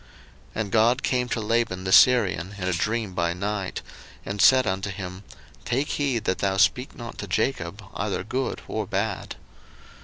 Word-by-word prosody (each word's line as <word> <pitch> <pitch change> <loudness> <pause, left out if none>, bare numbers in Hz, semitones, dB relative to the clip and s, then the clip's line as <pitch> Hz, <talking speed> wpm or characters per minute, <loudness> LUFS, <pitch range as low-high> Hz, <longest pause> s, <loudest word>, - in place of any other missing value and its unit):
01:031:024 - - -24 0.5
And 100 - -9
God 115 +4 +3
came 125 -1 0
to 115 - -1
Laban 110 -4 0
the 95 - -2
Syrian 100 - +5
in 90 -2 -3
a 95 - +1
dream 110 +3 -1
by 85 -1 0
night, 100 +1 -3 0.4
and 100 0 -3
said 130 -1 +6
unto 95 +1 -1
him, 95 -1 -7 0.4
Take 135 +5 -1
heed 135 -6 0
that 95 -3 -1
thou 95 -1 0
speak 125 +5 +2
not 120 -1 -9
to 100 - -5
Jacob 100 -1 -1
either 100 -2 -2
good 130 +5 -3
or - - -3
bad. - - -2
105 Hz, 175 wpm, -25 LUFS, 95-120 Hz, 0.5 s, said